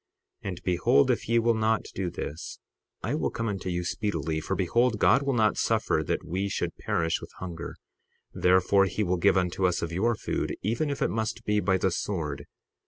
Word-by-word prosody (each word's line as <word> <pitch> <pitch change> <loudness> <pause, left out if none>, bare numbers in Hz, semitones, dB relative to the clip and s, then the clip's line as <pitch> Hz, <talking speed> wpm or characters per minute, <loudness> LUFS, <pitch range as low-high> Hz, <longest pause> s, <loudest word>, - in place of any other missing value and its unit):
60:35 - - -3
And 90 -2 -7
behold, 85 -6 +3
if - - -2
ye 115 - +4
will 115 0 +3
not 110 0 +1
do 95 -2 -2
this 80 -2 -6 0.5
I - - -1 0.2
come 115 - -3
unto 95 -3 -3
you 90 0 -1
speedily; 90 -4 -2
for 95 - -2
behold, 115 +6 +2
God 135 - +4
will 140 -2 0
not 110 -3 +3
suffer - - +1
that - - -2
we 95 +4 -2
should - - -2
perish 80 -1 0
with - - -9
hunger; 85 -2 -6 0.6
therefore 95 +2 +4
he 100 +3 -1
will 90 -1 +1
give 85 - +4
unto 90 0 +1
us 90 -2 -1
of 85 - -3
your 110 +7 +1
food, - - -2
even 115 +9 0
if 140 - -1
it - - +1
must 110 +1 -3
be 105 0 +2
by 95 -1 +2
the 95 0 +1
sword. 75 -7 -3
95 Hz, 200 wpm, -27 LUFS, 90-110 Hz, 0.6 s, ye